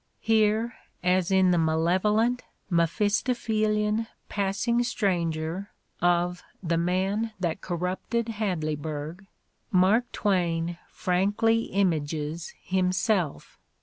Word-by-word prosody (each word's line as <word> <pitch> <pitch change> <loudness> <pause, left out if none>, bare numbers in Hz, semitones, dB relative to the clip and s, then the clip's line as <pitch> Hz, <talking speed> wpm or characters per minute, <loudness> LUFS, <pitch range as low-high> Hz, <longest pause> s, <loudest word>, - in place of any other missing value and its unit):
Here, 225 +1 +2 0.3
as 180 0 +2
in 190 -1 +4
the 175 - +3
malevolent, 190 +9 +2 0.3
Mephistophelian 210 - +1 0.2
"passing 205 +4 0
stranger" 175 -4 -1 0.3
of 175 0 +2 0.2
"The 170 -1 +1
Man 190 +6 0
That 175 0 -2
Corrupted 185 +6 -2
Had 205 -6 -1
leyburg, 155 +4 -4
' - - -46
' - - -45
Mark 205 +6 +3
Twain 175 -4 0
frankly 205 +5 +1
images 160 -4 -1
himself. 185 -2 0
185 Hz, 95 wpm, -27 LUFS, 170-215 Hz, 0.3 s, in